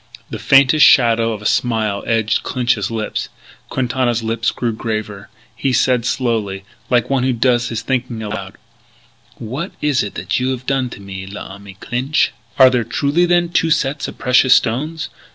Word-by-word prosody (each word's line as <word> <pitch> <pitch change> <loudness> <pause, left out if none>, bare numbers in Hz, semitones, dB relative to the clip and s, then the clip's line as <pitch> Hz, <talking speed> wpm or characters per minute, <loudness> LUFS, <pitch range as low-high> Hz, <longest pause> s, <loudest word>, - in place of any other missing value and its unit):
The - - -5
faintest 140 +2 +5
shadow 115 -2 +5
of 105 -1 -6
a - - -12
smile 110 -3 0
edged 110 -1 +1
Clinch's 120 -5 -1
lips. 110 -2 -3 0.4
Quintana's 125 -2 -1
lips 115 0 0
grew 120 -2 -2
graver. 110 -3 -5 0.3
He 130 +3 -1
said 125 -1 +2
slowly, 110 -7 -1 0.3
like 125 +1 +1
one 135 -2 +2
who 130 0 +1
does 120 0 +1
his 115 -1 -4
thinking 125 -3 -2
aloud: 100 -2 -6 0.8
"What 130 - -6
is 145 -2 +1
it 95 0 -3
you 130 +1 -1
have 130 -1 -4
done 135 -2 0
to - - -10
me, 95 -1 -8
l'ami 100 0 -10
Clinch?... 125 +9 -1 0.3
Are 130 -1 +7
there 125 -2 +1
truly 145 +9 +1
then 175 0 +2
two 165 -1 +1
sets 145 -1 0
of - - -9
precious 125 0 +4
stones? 150 +7 -1
120 Hz, 165 wpm, -18 LUFS, 110-130 Hz, 0.8 s, Are